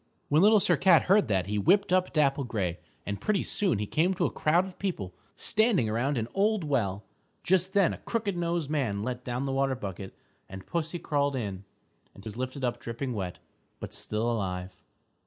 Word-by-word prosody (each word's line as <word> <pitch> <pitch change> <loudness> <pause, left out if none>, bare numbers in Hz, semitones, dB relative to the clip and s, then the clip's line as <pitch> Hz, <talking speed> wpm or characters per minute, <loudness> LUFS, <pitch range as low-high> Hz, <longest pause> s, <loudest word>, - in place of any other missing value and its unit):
_" - - -40 0.3
When 150 +2 +4
Little 215 +2 +6
Sir 175 -4 +3
Cat 180 -2 +5
heard 200 +2 +4
that 95 -3 +1
he 105 +2 -1
whipped 195 - +3
up 185 0 +2
Dapple 140 -2 +2
Gray 100 -8 -2 0.3
and 100 0 -4
pretty 210 -2 +1
soon 190 - +1
he 105 - -2
came 165 - +1
to 175 -1 +1
a - - 0
crowd 170 +4 +2
of 190 -2 -11
people 110 - -3 0.2
standing 215 - +2
around 120 +6 0
an 115 -1 -1
old 205 0 +2
well. 110 -9 -1 0.4
Just 185 +1 +2
then 195 -4 +3
a - - -8
crooked 215 -5 -2
nosed 170 -3 -1
man 125 -10 -1
let 125 +1 -4
down 125 +2 -3
the 135 - -2
water 135 0 +1
bucket 100 -4 -7 0.3
and 95 0 -9
pussy 170 0 -2
crawled 145 -4 0
in 100 -6 -4 0.5
and 100 - -14
was 110 -1 -6
lifted 130 +2 -4
up 120 -1 -1
dripping 120 +2 -4
wet, 95 -5 -4 0.4
but - - -7
still 110 +2 -2
alive. 90 -4 -3
135 Hz, 200 wpm, -28 LUFS, 105-180 Hz, 0.5 s, Little